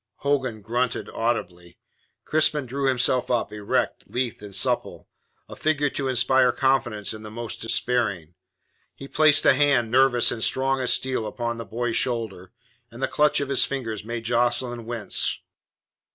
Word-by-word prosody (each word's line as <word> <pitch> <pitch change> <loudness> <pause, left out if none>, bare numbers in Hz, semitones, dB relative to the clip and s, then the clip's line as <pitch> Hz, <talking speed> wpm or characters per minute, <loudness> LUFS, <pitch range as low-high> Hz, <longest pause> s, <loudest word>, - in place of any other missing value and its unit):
Hogan 130 -7 -1
grunted 120 +3 -2
audibly. 90 -7 -3 0.5
Crispin 155 -2 +1
drew 135 +2 -2
himself 125 -1 +1
up, 120 -3 -1
erect, 105 +4 -2
lithe 125 -4 -3
and 100 -2 -7
supple - - 0 0.4
a - - -10
figure 145 -2 0
to 135 - -3
inspire 130 0 +3
confidence 125 -7 0
in 110 - -9
the 110 - -8
most 115 +1 -5
despairing. 110 -8 0 0.6
He 135 - -10
placed 155 0 +4
a - - +7
hand, 130 -5 +2
nervous, 130 -2 +4
and 110 - -3
strong 135 0 0
as 125 -2 +1
steel, 130 -4 0
upon 120 +1 -4
the 115 - -6
boy's 115 +3 -2
shoulder, 110 -7 -2 0.4
and 120 +3 -9
the - - +2
clutch 150 0 +2
of 140 - -3
his 140 - +2
fingers 115 -7 -4
made 115 +1 -5
Jocelyn 120 0 0
wince. 120 -3 -1
120 Hz, 155 wpm, -24 LUFS, 115-135 Hz, 0.6 s, a